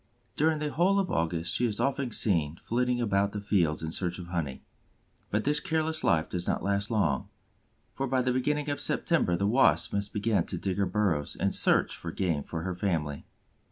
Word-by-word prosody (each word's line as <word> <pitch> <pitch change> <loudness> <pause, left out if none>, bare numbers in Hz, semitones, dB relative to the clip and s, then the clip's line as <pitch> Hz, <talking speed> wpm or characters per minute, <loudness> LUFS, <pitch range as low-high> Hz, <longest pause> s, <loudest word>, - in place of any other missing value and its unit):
During 155 +1 +2
the 150 0 -3
whole 190 +4 +3
of 190 -3 -1
August 85 +1 0
she 125 - +2
is 105 -2 -3
often 135 -1 0
seen 85 -9 +1
flitting 125 +1 0
about 100 -3 +1
the 105 - -3
fields 85 -7 +1
in 80 - -3
search 90 0 -2
of 90 -2 -8
honey. 80 -7 -3 0.7
But 105 +1 0
this 150 +1 +2
careless 160 0 -1
life 80 -3 +2
does 90 -1 -3
not - - -1
last 100 +1 0
long, 110 -3 0 0.6
for 135 - -2
by 130 0 +1
the 125 0 +1
beginning 150 +3 0
of 145 0 -1
September 90 - +1
the 100 +3 0
Wasp 125 +6 +3
must 100 0 -1
begin 105 -1 +1
to 90 - -3
dig 95 +2 -2
her 100 -1 +1
burrows 95 -9 0
and - - +1
search - - +3
for 85 - -6
game 85 -5 -1
for 80 +2 -5
her 95 0 -2
family. 80 -6 -2
100 Hz, 200 wpm, -28 LUFS, 85-130 Hz, 0.7 s, whole